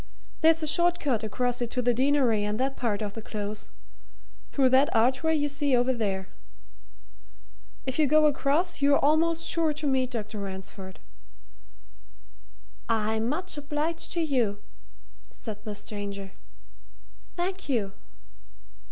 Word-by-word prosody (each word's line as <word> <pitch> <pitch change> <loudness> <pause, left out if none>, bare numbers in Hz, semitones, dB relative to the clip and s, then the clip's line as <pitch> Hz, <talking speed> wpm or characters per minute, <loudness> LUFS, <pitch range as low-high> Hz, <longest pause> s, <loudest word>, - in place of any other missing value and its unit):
There's 325 0 +4
a - - -1
short 345 +3 +3
cut 250 -7 0
across 245 +3 -1
it 240 - -1
to 250 - -1
the 245 0 +3
Deanery 255 -4 +2
and 210 +2 -2
that 270 +1 0
part 220 -3 -1
of 205 -1 -4
the 225 - -7
Close 210 -1 -5 0.8
through 270 -2 +3
that 265 +4 +5
archway 265 +8 +3
you 290 -1 +1
see 285 -2 +1
over 250 +2 +2
there. 195 -5 -2 1.6
If 260 +3 -3
you 305 - +4
go 305 +2 +5
across, 300 +4 +1
you're 280 0 +5
almost 325 +3 +2
sure 325 -2 +2
to 300 +1 -5
meet 260 -2 +1
Dr. 215 -3 -5
Ransford." 190 -1 -8 1.9
"I'm 220 0 +1
much 335 +2 -2
obliged 300 +3 -2
to 340 - 0
you," 250 -10 +1 0.7
said 210 -2 -8
the 210 -1 -4
stranger. 200 -2 -6 1.0
"Thank 370 -1 -3
you." 210 -7 0
260 Hz, 135 wpm, -27 LUFS, 215-300 Hz, 1.9 s, that